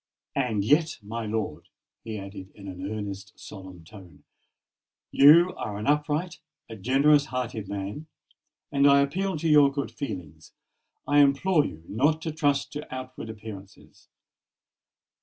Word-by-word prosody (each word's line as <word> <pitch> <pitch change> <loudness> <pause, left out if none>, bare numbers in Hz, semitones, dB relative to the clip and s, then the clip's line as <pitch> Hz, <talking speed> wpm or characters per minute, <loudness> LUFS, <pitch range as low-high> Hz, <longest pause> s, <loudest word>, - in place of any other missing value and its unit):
And 110 -5 0
yet, 155 +6 +2
my 110 +2 -5
lord," 105 -8 -4 0.3
he 110 -1 -5
added 95 -1 -9
in 100 -2 -11
an 95 +1 -6
earnest, 105 -1 -6
solemn 95 -4 -11
tone, 90 -4 -15 0.9
"you 170 +6 +7
are 105 -2 -5
an 105 - -5
upright—a 150 -2 -2
generous 140 +7 +4
hearted 120 -6 -4
man; 100 +9 -5 0.6
and 140 -1 +4
I 140 0 +6
appeal 185 +6 -1
to 165 +2 -2
your 145 -3 +6
good 140 -1 -4
feelings—I 90 - -5
implore 145 +3 +4
you 80 +1 -11
not 145 +9 +1
to 160 - -2
trust 145 -2 0
to 150 +1 -7
outward 130 -2 -7
appearances. 105 -3 -11
125 Hz, 130 wpm, -26 LUFS, 100-150 Hz, 0.9 s, you